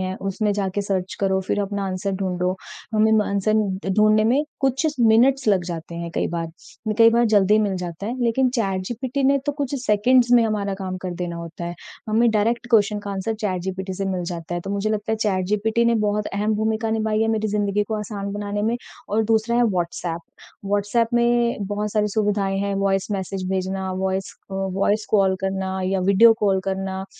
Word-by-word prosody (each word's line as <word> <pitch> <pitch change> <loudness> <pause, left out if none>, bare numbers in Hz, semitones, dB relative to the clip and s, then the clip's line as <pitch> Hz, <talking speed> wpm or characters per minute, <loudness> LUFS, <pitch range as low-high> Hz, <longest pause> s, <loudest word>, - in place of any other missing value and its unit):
हैं, 185 0 -3
उसमें 195 +2 -1
जाके 200 0 -1
सर्च 190 -2 -2
करो, 190 -1 +1
फ़िर 190 +2 -1
अपना 200 0 -3
आंसर 190 +1 -2
ढूँढ़ो। 180 0 -1 0.4
हमें 215 0 +4
म 220 - +5
अ, - - -4
आंसर 200 +2 +1 0.4
ढूँढ़ने 215 +2 +4
में 260 +6 +3 0.2
कुछ 270 +2 +1
इच 300 - -1
मिनट्स 240 +4 +4
लग 190 -4 +3
जाते 170 -1 -6
हैं 170 0 -5
कई - - 0
बार, 165 -1 -3 0.5
कई 230 0 +8
बार 235 +1 +3
जल्दी 205 +1 +5
मिल 205 -3 0
जाता 180 +2 -5
है। 240 - -3
लेकिन 255 +3 +2
चैट 195 -6 0
जीपीटी 255 +3 -3
ने 275 +1 +4
तो 290 - +1
कुछ 285 -1 -3
सेकंड्स 240 +4 +4
में 240 -1 +7
हमारा 205 -3 -1
काम 190 -1 -5
कर 185 - -3
देना 175 -1 -4
होता 170 0 -7
है। 175 0 -4 0.3
हमें 225 +2 +3
डायरेक्ट 230 +3 0
क्वेश्चन 210 -2 +3
का 205 - -6
आंसर 200 +3 -2
चैट 190 -4 -1
जीपीटी 190 0 -4
से 195 - -3
मिल 190 -2 -2
जाता 170 0 -5
है। 175 - -2
तो 195 - -6
मुझे 200 +1 -1
लगता 215 +1 -1
है - - +1
चैट 200 -4 0
जीपीटी 220 +3 +1
ने 235 0 +3
बहुत 210 -1 0
अहम 210 +2 -1
भूमिका 220 +1 -1
निभाई 220 -1 0
है 225 - +1
मेरी 220 -1 0
ज़िंदगी 205 0 0
को 220 - -1
आसान 200 -1 -5
बनाने 205 0 -3
में 230 +2 +1 0.3
और 215 +2 +1
दूसरा 225 +2 +1
है 245 - +4
व्हाट्सएप 170 -2 -2 0.4
व्हाट्सएप 205 +3 +1
में 240 0 +2
बहुत 205 +1 -3
सारी 210 -1 +1
सुविधाएँ 200 -2 0
हैं, 200 0 -1
वॉइस 195 0 0
मैसेज 190 -1 -3
भेजना, 190 0 -2
वॉइस 190 0 -2 0.2
अ, - - -5
वॉइस 195 +2 0
कॉल 195 -3 +3
करना 190 0 -2
या 190 0 0
वीडियो 200 +5 +6
कॉल 195 -2 +2
करना, 190 0 -3
205 Hz, 205 wpm, -22 LUFS, 190-220 Hz, 0.5 s, कई